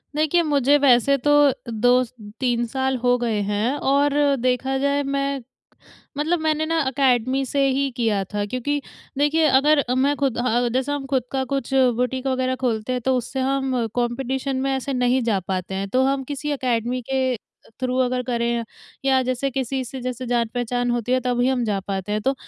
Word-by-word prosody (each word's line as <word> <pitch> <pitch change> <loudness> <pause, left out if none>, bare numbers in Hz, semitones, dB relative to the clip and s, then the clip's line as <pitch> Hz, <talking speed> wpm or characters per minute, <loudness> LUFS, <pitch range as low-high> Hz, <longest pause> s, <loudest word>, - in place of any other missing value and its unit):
देखिए 310 +3 +2
मुझे 285 -2 +3
वैसे 275 0 +4
तो 290 - +4 0.4
2-3 240 0 0
साल 265 +2 -1
हो 245 0 +4
गए 230 -3 -1
हैं 215 +6 0 0.2
और 280 +1 +3 0.3
देखा 255 +2 0
जाए 280 +1 +1
मैं, 275 -1 -1 0.8
मतलब 325 +4 0
मैंने 315 0 0
ना 330 +1 0
अकेडमी 260 -1 +1
से 275 +2 +1
ही 275 +1 +1
किया 215 -4 +1
था। 205 0 -1
क्योंकि 265 +6 -2 0.4
देखिए 295 +3 +3
अगर 295 0 +3
मैं 280 +2 +2
खुद 270 -5 0
अ - - 0
अ 245 0 +1
जैसे 265 +3 0
हम 285 -2 -3
खुद 265 -3 0
का 265 -1 0
कुछ 270 -1 -2 0.2
बुटीक 250 +2 -1
वग़ैरह 260 0 0
खोलते 225 0 -1
हैं 250 - -2
तो 260 +2 +1
उससे 255 +2 -4
हम 265 -2 0
कॉम्पिटिशन 260 +2 -2
में 275 - 0
ऐसे 265 +1 -3
नहीं 250 +1 +2
जा 215 -4 +1
पाते 185 0 -4
हैं 195 +1 -3
तो 255 +5 +2
हम 270 0 0
किसी 295 +2 -4
अकेडमी 250 -2 -1
के 260 -1 +1 0.4
थ्रू 255 0 -1
अगर 250 0 -1
करें 235 -1 0 0.4
या 265 -1 +4
जैसे 255 +2 -1
किसी 265 0 -2
से 260 +2 -7
जैसे 255 0 -4
जान-पहचान 245 +1 -1
होती 240 0 -2
है 255 - +3
तभी 245 0 +1
हम 260 -2 +1
जा 205 -3 0
पाते 195 +1 -4
हैं, 215 - 0
तो 270 +5 +1
255 Hz, 185 wpm, -22 LUFS, 240-275 Hz, 0.8 s, वैसे